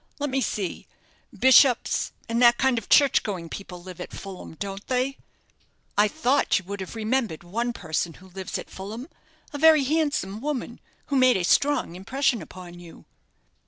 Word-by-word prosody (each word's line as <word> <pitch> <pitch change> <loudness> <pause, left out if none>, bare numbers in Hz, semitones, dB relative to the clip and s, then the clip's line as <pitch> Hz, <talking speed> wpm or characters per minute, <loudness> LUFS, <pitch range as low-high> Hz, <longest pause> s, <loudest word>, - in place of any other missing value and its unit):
Let 290 -2 -2
me 270 +1 0
see, 195 -7 -3 0.4
bishops, 260 -1 +4 0.2
and 230 +1 0
that 240 -1 +6
kind 265 -3 +2
of 215 - -16
church 280 -2 +5
going 180 -5 -5
people 180 -2 -8
live 185 -2 -9
at - - -7
Fulham, 190 -4 -9
don't 195 +3 -6
they?" 260 +2 -1 0.8
"I 205 +1 +5
thought 285 +2 +2
you 190 - -5
would 200 +2 -6
have 190 +4 -7
remembered 225 -6 -1
one 230 +8 -2
person 160 -5 -3
who 190 +1 -16
lives 190 +1 -5
at - - -9
Fulham 215 +7 -7 0.5
a 290 - -4
very 315 -1 +6
handsome 280 -9 -1
woman, 270 -4 -4 0.3
who - - +3
made 255 -4 +5
a 185 - -2
strong 280 -2 +2
impression 240 +4 0
upon 175 +1 -11
you." 170 -2 -14
225 Hz, 170 wpm, -25 LUFS, 185-265 Hz, 0.8 s, that